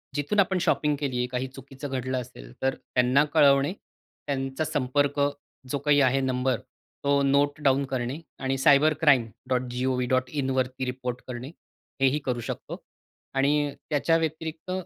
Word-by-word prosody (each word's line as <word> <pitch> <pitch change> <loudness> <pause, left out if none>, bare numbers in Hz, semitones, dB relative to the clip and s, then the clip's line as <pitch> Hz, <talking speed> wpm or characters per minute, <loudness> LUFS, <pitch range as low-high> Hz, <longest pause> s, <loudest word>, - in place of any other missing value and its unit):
जिथून 145 +8 0
आपण 190 -1 +3
शॉपिंग 150 -3 +2
केली 135 -4 -2
आहे 125 0 0
काही 125 +1 -3
चुकीचं 135 +2 -9
घडलं 130 -1 -2
असेल, - - -12
तर 135 0 +1
त्यांना 125 +3 +2
कळवणे, 140 +3 +5
त्यांचा 135 -6 -6
संपर्क 145 +1 0 0.5
जो 145 - 0
काही 145 -1 +5
आहे 135 0 +3
नंबर, 130 -2 0 0.4
तो 140 0 +3
नोट 145 +2 +2
डाउन 135 0 +3
करणे 130 +2 -2 0.2
आणि 135 0 -1
cybercrime.gov.in 130 -2 +2
वरती 130 0 -1
रिपोर्ट 125 -1 -4
करणे, 125 +2 -6 0.5
हे 135 - +6
ही 140 +3 +1
करू 125 -2 -1
शकतो 120 - -6 0.5
आणि 145 +1 +2 0.2
त्याच्या 160 +2 +2
व्यतिरिक्त 160 +2 -4
135 Hz, 135 wpm, -26 LUFS, 130-145 Hz, 0.5 s, हे